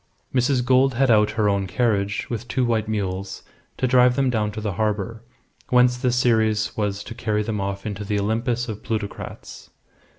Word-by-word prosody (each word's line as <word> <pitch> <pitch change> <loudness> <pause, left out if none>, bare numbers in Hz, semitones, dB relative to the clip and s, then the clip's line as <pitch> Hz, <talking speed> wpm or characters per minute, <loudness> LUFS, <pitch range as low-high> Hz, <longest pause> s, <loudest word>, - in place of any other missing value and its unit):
Mrs. 125 -1 +2
Gould 130 0 +3
had 130 0 +3
out 105 -1 +4
her 105 -2 +3
own 100 -1 +1
carriage, 105 -1 0
with 120 0 -5
two 125 0 0
white 110 -2 0
mules, 95 -2 -3 0.3
to - - 0
drive 125 0 +4
them 135 -1 +2
down 105 -3 0
to 110 - -5
the 105 -1 -2
harbour, 105 +2 -2 0.5
whence 125 0 +4
the 125 0 0
Ceres 110 -3 +2
was 105 -1 -2
to - - -8
carry 110 -2 -1
them 105 -2 -3
off 100 0 -4
into 105 -1 -4
the 105 0 -1
Olympus 115 +4 -1
of 110 -2 -6
plutocrats. 110 -2 -6
110 Hz, 185 wpm, -23 LUFS, 105-125 Hz, 0.5 s, out